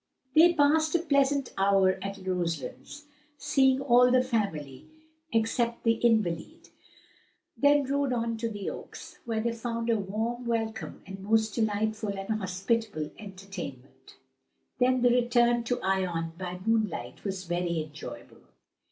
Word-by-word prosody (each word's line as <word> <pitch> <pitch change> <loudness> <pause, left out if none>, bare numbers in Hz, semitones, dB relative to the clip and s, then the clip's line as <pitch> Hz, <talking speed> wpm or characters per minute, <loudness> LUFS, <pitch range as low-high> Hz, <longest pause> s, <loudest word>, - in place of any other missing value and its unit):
They 335 +3 +7
passed 315 +2 +3
a - - +4
pleasant 280 -4 +1
hour 195 -1 +3
at 195 0 -6
Roselands, 175 - -4 0.3
seeing 265 -2 +3
all 250 -2 +5
the 255 0 +4
family 160 - -3 0.4
except 235 +1 0
the 230 - +4
invalid, 225 - 0 0.9
then 285 0 +4
rode 280 0 0
on 230 -1 -1
to 230 +1 -2
the 205 -3 -6
Oaks, - - -10
where 225 -2 -1
they 235 +1 0
found 230 0 -2
a 225 - +2
warm 225 +5 -3
welcome 220 -7 -3
and 195 +1 -8
most 220 +2 +1
delightful 215 -2 -1
and 195 +2 -6
hospitable 190 -3 -2
entertainment. 190 - -9 0.6
Then 255 0 +3
the 245 - +5
return 240 -1 +3
to 245 +1 -1
Ion 180 -4 0
by 180 0 -6
moonlight 215 - -1
was 190 -2 -3
very 175 -2 -1
enjoyable. 155 0 -10
220 Hz, 135 wpm, -28 LUFS, 190-245 Hz, 0.9 s, They